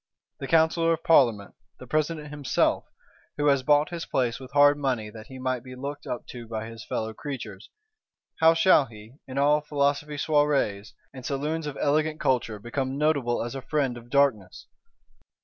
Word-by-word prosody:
The 135 - -5
Counsellor 165 +1 +3
of 165 - -5
Parlement, 115 -10 +3 0.2
the - - -11
President 155 +2 -1
himself, 145 -2 0 0.5
who 145 - 0
has 140 -2 +3
bought 145 +3 +3
his 170 -2 -6
place 125 -2 0
with 130 0 -11
hard 145 0 +6
money 125 -6 -2
that 110 0 -11
he 130 - -10
might 130 -1 -2
be 130 -1 -10
looked 140 +3 -6
up 120 - -4
to 120 -2 -9
by 110 -1 -4
his 115 0 -9
fellow 110 0 -3
creatures, 110 -8 -7 0.7
how 160 0 +6
shall 165 -4 +5
he, 110 +3 -14
in 130 0 -7
all 145 +2 +3
Philosophe 145 0 -1
soirées, 145 -9 +1 0.2
and 130 -2 -10
saloons 150 +4 -2
of 145 - -6
elegant 155 +2 +1
culture, 120 -4 0
become 130 +5 -3
notable 140 -6 +1
as 120 - -5
a 135 - -5
Friend 140 -3 -1
of 120 0 -12
Darkness? 125 -10 +1
135 Hz, 175 wpm, -26 LUFS, 120-150 Hz, 0.7 s, hard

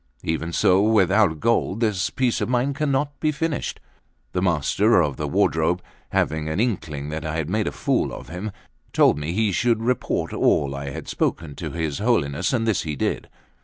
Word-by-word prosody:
Even 80 +1 -2
so 95 +2 +4
without 100 -5 +3
gold 115 -1 +1
this 105 -5 +1
piece 125 -3 0
of - - -1
mine 125 +3 +1
cannot 145 0 -1
be 155 - +1
finished." 155 +1 -2 0.5
The 90 - -1
Master 90 +5 +3
of 75 -5 +1
the - - -3
Wardrobe, 80 +3 +1 0.3
having 80 0 0
an 80 +5 -2
inkling 80 - -2
that 80 0 -4
I 80 0 -3
had 80 +1 -2
made 105 0 0
a - - -1
fool - - 0
of - - -8
him, 90 +5 -5 0.4
told - - +4
me 75 +2 -3
he 105 +2 +1
should 115 +3 +1
report 125 +1 -1
all 70 -1 +2
I 70 0 -5
had 65 - -7
spoken 80 -3 -2
to - - -4
his 80 -4 -3
Holiness; 90 - +1
and 115 -3 0
this 110 -4 +1
he 75 -2 -4
did. - - -2
95 Hz, 190 wpm, -23 LUFS, 80-115 Hz, 0.5 s, so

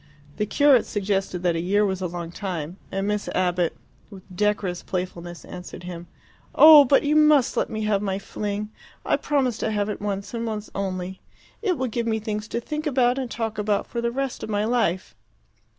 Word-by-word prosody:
The 210 - -1
curate 280 -1 +4
suggested 195 -3 -2
that 175 -2 +2
a 165 - -1
year 205 +4 +2
was 190 -1 -2
a 185 - -1
long 170 -1 -6
time; 175 -3 -5
and 195 +1 -2
Miss 210 0 -1
Abbott, 180 -2 +1 0.3
with 195 -3 -12
decorous 205 -3 0
playfulness, 175 -2 -5
answered 180 0 -9
him, 175 -1 -7 0.5
"Oh, 305 -2 +10
but 275 +2 +4
you 295 +1 +2
must 300 -4 +5
let - - 0
me 220 0 -3
have 210 -2 +1
my 195 -2 -1
fling! 205 +1 -4 0.3
I - - +3
promise 265 -6 0
to - - -1
have 205 -1 -1
it 210 - -4
once, 200 0 -3
and 230 0 -3
once 215 -1 -5
only. 190 -1 -4 0.4
It 380 -7 0
will 260 - -1
give 235 -1 -2
me 220 -1 +1
things 215 0 -4
to 235 - -2
think 305 +6 -4
about 255 -2 +2
and 255 -2 -3
talk 225 -2 -3
about 210 -1 0
for 235 - -4
the 235 - 0
rest 270 +1 -3
of - - -6
my 205 0 0
life." 190 - 0
210 Hz, 200 wpm, -24 LUFS, 185-235 Hz, 0.5 s, Oh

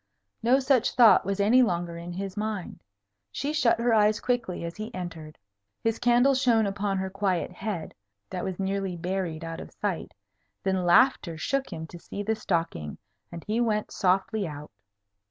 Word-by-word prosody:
No 245 +4 +4
such 265 -3 +2
thought 235 -5 +7
was 200 0 -1
any 220 +6 +5
longer 175 -6 0
in 170 +1 -7
his 195 +1 -5
mind. 210 -3 -4 0.5
She 290 - -2
shut 255 -7 +3
her 235 0 +2
eyes 210 0 +4
quickly 230 -10 -2
as 170 - -6
he 215 +1 -6
entered. 165 -4 -7 0.5
His 225 0 0
candle 245 +3 +4
shone 240 -4 +3
upon 200 0 -1
her 190 0 -3
quiet 190 -3 -1
head, 185 -3 -5 0.4
that 180 - -3
was 190 -2 -3
nearly 195 -2 -2
buried 175 -2 -3
out 165 0 -5
of - - -9
sight; 200 -5 -4 0.5
then 190 -2 0
laughter 175 -3 +4
shook 270 +10 -1
him 160 -2 -5
to 170 +2 -11
see 200 +4 -6
the 220 +2 +1
stocking, 165 - -2 0.3
and 170 -1 -8
he 220 +3 0
went 215 -3 0
softly 195 +1 +1
out. 150 -1 -8
195 Hz, 175 wpm, -27 LUFS, 175-225 Hz, 0.5 s, thought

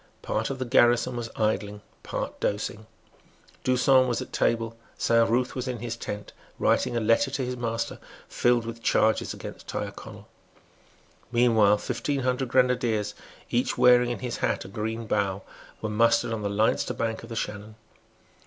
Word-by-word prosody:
Part 110 +3 -1
of 135 - -3
the 130 - -3
garrison 120 0 +3
was 120 -1 -4
idling, 105 -1 -1 0.2
part - - -5
dosing. 110 +1 -2 0.8
D'Usson 130 0 +4
was 120 - 0
at - - -7
table. 115 -1 0 0.2
Saint 115 -1 +3
Ruth 125 +2 +1
was 130 0 -4
in 125 -1 -2
his 115 0 -4
tent, 105 -3 -6 0.2
writing 120 - +1
a - - +2
letter 115 +5 +3
to 135 -1 -2
his 125 0 -3
master 115 -1 -3 0.3
filled 120 -1 +2
with 115 0 -7
charges 110 -1 +2
against - - -9
Tyrconnel. - - -6 1.0
Meanwhile, 115 -4 +4
fifteen 125 +5 -2
hundred 125 +1 0
grenadiers; 120 -4 +1 0.4
each - - 0
wearing 125 0 +6
in 120 - -4
his 120 - -3
hat - - -1
a - - -9
green 110 +3 -4
bough, 100 -2 -1 0.4
were 110 - -1
mustered 115 +1 +3
on 110 - -3
the 100 - -1
Leinster 105 +2 +1
bank 115 -1 -2
of 115 - -11
the 115 - -6
Shannon. 105 0 -5
115 Hz, 165 wpm, -26 LUFS, 110-125 Hz, 1.0 s, wearing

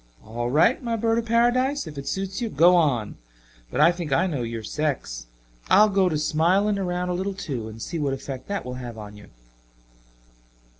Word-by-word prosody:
All 120 +2 -3
right, 160 - +3
my 235 -2 -2
bird 225 +1 +1
of 230 - -4
Paradise, 245 +4 +2
if 155 -2 -9
it 140 0 -7
suits 195 +3 -3
you, 235 - -1
go 175 +2 +5
on. 135 -11 +1 0.5
But 145 - -1
I 165 +3 +7
think 170 -4 -6
I 165 +7 +3
know 150 -9 -2
your 115 -1 -4
sex. 110 - -3 0.4
I'll 210 +2 +6
go 195 -2 +2
to 155 - -1
smiling 185 +7 +2
around 180 -1 -2
a - - 0
little, 190 +2 -3
too, 130 - -5
and 110 0 -10
see 165 +8 -4
what 145 -2 0
effect 135 -1 -7
that 200 -6 -3
will 125 - -5
have 120 -2 -7
on 105 -1 -9
you." 105 0 -14
165 Hz, 200 wpm, -24 LUFS, 125-200 Hz, 0.5 s, I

